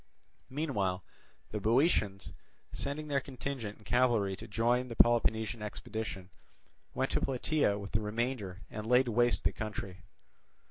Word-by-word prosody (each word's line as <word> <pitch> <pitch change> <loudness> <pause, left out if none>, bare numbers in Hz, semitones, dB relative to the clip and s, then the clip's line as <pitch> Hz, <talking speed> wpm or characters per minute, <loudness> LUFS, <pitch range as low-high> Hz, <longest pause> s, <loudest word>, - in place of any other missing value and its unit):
Meanwhile 105 - -1 0.5
the 105 - -2
Boeotians, 110 - +2 0.4
sending 150 +2 -3
their 140 -2 +2
contingent 130 -5 -5
and 105 - -20
cavalry 120 -6 +3
to 115 - -9
join 120 +3 +1
the 115 - -6
Peloponnesian 110 -1 +3
expedition, 105 -2 -5 0.6
went 130 0 0
to - - +1
Plataea 135 -4 +1
with 100 -1 -7
the 105 - +1
remainder 105 -3 -2
and 105 0 -5
laid 125 +1 +5
waste 120 +1 +3
the - - +2
country. 100 -4 -5
115 Hz, 135 wpm, -32 LUFS, 105-130 Hz, 0.6 s, laid